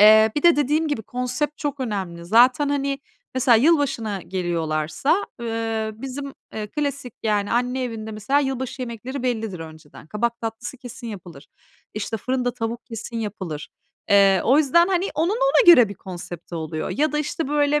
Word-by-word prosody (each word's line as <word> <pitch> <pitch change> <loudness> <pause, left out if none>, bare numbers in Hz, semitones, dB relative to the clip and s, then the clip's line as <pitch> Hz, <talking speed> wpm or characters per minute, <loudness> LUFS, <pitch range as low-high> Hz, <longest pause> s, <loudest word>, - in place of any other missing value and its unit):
Eee, 220 +1 +8
bir 295 - 0
de 340 -3 +6
dediğim 300 +3 +1
gibi, 240 -7 -2
konsept 250 +6 -3
çok 285 -2 -3
önemli. 190 -8 -3
Zaten, 250 +8 +5
hani, 280 -1 -1 0.4
mesela 255 -3 +5
yılbaşına 260 - +2
geliyorlarsa, 170 - -1
ııı, 225 -1 -2
bizim, 275 +1 -5 0.2
eee, 215 -1 -3
klasik 280 -2 -3
yani 210 -2 0
anne 250 +2 0
evinde 220 -2 -5
mesela 240 +7 +1
yılbaşı 260 -1 -3
yemekleri 245 +3 -5
bellidir 225 -8 -2
önceden. 160 -2 -11
Kabak 235 +5 -2
tatlısı 225 +3 -5
kesin 245 0 -9
yapılır. 175 -9 -9 0.5
İşte, 215 +1 -3
fırında 250 +2 -1
tavuk 230 0 -4
kesin 230 0 -6
yapılır. 190 -9 -5 0.4
Eee, 195 -2 +6
o 265 +5 +5
yüzden, 340 +5 +4
hani, 375 +1 +1
onun 325 +5 +1
ona - - +3
göre 240 -5 +5
bir 200 - -7
konsepti 175 -2 -8
oluyor. 155 -1 -4
Ya 300 +2 +1
da, 300 - 0
işte, 300 0 -2
böyle, 295 0 +2
235 Hz, 160 wpm, -23 LUFS, 205-280 Hz, 0.5 s, Eee